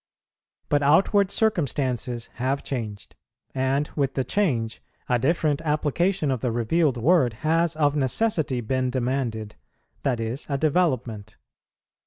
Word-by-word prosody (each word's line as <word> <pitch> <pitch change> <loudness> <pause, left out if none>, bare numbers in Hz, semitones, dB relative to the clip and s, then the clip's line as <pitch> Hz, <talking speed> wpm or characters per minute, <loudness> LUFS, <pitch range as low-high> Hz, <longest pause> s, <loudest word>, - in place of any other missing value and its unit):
But 145 0 +2
outward 185 +7 +4
circumstances 135 - -1
have 135 +2 0
changed, 110 -7 -5 0.4
and 135 +2 0
with 135 -3 0
the 130 - +1
change, 125 - -1 0.3
a 125 -1 +2
different 155 +1 +1
application 155 +2 0
of 130 - -1
the 125 - 0
revealed 125 +5 +1
word 130 -1 +3
has 165 +1 +2
of 145 -2 +2
necessity 145 - 0
been 130 +3 -1
demanded, 125 -4 -2 0.4
that 125 -4 0
is, 115 +5 -4
a 140 - 0
development. 130 - 0
135 Hz, 125 wpm, -25 LUFS, 120-155 Hz, 0.4 s, outward